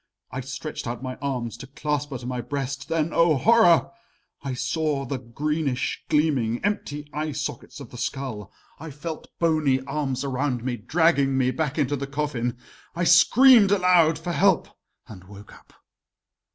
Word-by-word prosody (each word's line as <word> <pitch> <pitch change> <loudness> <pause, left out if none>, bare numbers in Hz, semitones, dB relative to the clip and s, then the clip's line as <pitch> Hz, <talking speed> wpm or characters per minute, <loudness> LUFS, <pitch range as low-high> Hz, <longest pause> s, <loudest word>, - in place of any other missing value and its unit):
I 130 - -4
stretched 135 +2 -6
out 120 +2 -5
my 130 -1 -4
arms 125 -5 -3
to 135 +3 -10
clasp 145 +1 -3
her 135 - -5
to 120 - -11
my 125 0 -3
breast 140 0 -4
then, 165 0 0
oh 165 -2 +4
horror! 215 - +4 0.5
I 135 -2 -4
saw 140 +2 -1
the 135 +1 -4
greenish 140 +2 -2
gleaming, 135 -7 +1
empty 150 -8 -3
eye 150 0 -3
sockets 145 +1 -6
of 135 -5 -11
the 125 - -9
skull. 125 -6 -4 0.3
I 160 +2 -8
felt 155 +3 -7
bony 155 -5 +2
arms 140 -1 -3
around 130 -2 -2
me, 125 -1 -2
dragging 140 +2 +2
me 130 -1 +2
back 155 +1 -2
into 145 -1 +1
the 140 0 -5
coffin. 135 -4 -2 0.4
I 175 - -1
screamed 205 +6 +6
aloud 180 -5 +4
for 165 +2 -5
help 190 0 +2 0.4
and 95 -4 -12
woke 100 +1 -13
up. - - -19
140 Hz, 165 wpm, -24 LUFS, 130-160 Hz, 0.5 s, screamed